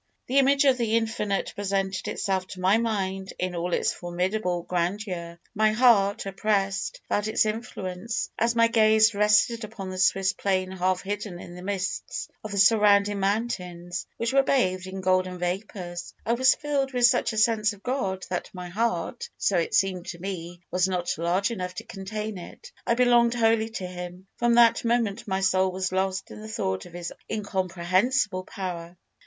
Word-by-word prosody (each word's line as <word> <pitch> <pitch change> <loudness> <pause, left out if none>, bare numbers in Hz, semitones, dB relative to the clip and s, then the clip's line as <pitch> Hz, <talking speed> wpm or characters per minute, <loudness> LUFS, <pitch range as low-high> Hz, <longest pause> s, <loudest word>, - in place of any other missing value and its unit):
"The 270 +3 +3
image 275 +1 +4
of 260 -2 +4
the 230 -1 +2
Infinite 220 -3 -1
presented 195 -1 -2
itself 190 -2 -1
to 185 - -9
my 190 +4 +3
mind 195 -4 -2
in 185 0 -2
all 175 +1 -2
its - - +1
formidable 180 +1 -2
grandeur. 175 -1 -3
My 215 0 +3
heart, 215 -5 +4
oppressed, 195 0 -1
felt 205 +1 0
its 220 - +2
influence, 215 -1 -4
as 230 +1 +1
my 230 0 +5
gaze 220 -1 +5
rested 210 +3 +3
upon 195 -3 -7
the 185 - -5
Swiss 190 +1 +3
plain 185 -1 -1
half 185 0 0
hidden 205 -2 -4
in 175 - -10
the 180 - -9
mists 195 0 -3
of 215 - -5
the 200 - -3
surrounding 205 0 +5
mountains, 180 -4 -2
which 230 +2 -1
were 275 - +6
bathed 185 -9 +1
in 190 0 -6
golden 185 0 +1
vapours. 180 -1 -4
I 230 - +2
was 260 +2 +4
filled 280 -2 -1
with 245 -1 +4
such 240 - +3
a 220 - -5
sense 215 -1 +3
of 205 -1 -13
God 195 -8 -2
that 180 - -2
my 180 -1 -6
heart 210 0 -2
so 190 -3 +2
it 165 - -1
seemed 185 -2 +1
to 170 - -6
me 175 -2 -6
was 180 +1 +2
not 180 -2 -1
large 180 +5 +1
enough 180 -4 -4
to - - -6
contain 210 +1 -5
it. 470 - -11 0.2
I 235 - +3
belonged 240 -1 +4
wholly 225 -1 +2
to 210 -4 -5
Him. 180 0 -8
From 235 0 +3
that 235 -1 +5
moment 230 -3 0
my 190 -1 -1
soul 190 0 +2
was 185 0 -2
lost 190 0 -1
in - - -9
the 215 - -8
thought 95 - -2
of 175 - -16
His 175 -1 -5 0.2
incomprehensible 190 +1 0
power. 175 -3 -6
195 Hz, 180 wpm, -26 LUFS, 185-220 Hz, 0.2 s, were